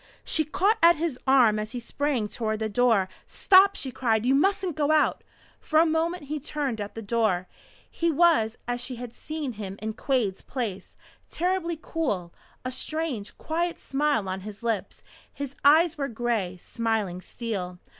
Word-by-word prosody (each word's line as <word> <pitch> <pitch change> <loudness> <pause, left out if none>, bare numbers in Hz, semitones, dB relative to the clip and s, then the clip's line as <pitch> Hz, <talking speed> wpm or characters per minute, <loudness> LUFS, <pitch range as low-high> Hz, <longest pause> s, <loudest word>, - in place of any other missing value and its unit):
She 315 - +2
caught 395 +8 +2
at 340 +1 +7
his 310 -4 -2
arm 245 -5 +5
as 215 +1 -5
he 245 - -3
sprang 255 -2 -1
toward 220 0 -2
the 220 0 -2
door. 225 -4 +3 0.2
"Stop!" 390 +1 +5
she 265 - -4
cried. 225 -3 0
"You 260 - +4
mustn't 375 +3 +2
go 300 -1 +1
out 310 -1 +2 0.2
" - - -30
For 310 - +2
a 330 - +6
moment 325 +1 0
he 300 +2 -4
turned 275 -6 -3
at 205 - -6
the 225 - -6
door. 205 -4 +1 0.4
He 335 - -1
was 310 -9 +3
as 245 0 -1
she 250 +1 -4
had 240 -1 -8
seen 305 -2 -5
him 200 -2 -7
in 220 +1 -3
Quade's 225 -7 -1
place, 225 -8 -5 0.3
terribly 350 -1 -1
cool, 210 - -2 0.3
a 255 - -2
strange, 270 -5 -3
quiet 340 +2 -2
smile 275 -7 0
on 185 0 -3
his 205 +3 -9
lips. 225 -4 -2 0.3
His 280 -1 -6
eyes 315 +3 +5
were 275 - 0
gray, 225 -6 -2
smiling 215 -3 -2
steel. 190 -6 -5
250 Hz, 175 wpm, -26 LUFS, 215-310 Hz, 0.4 s, at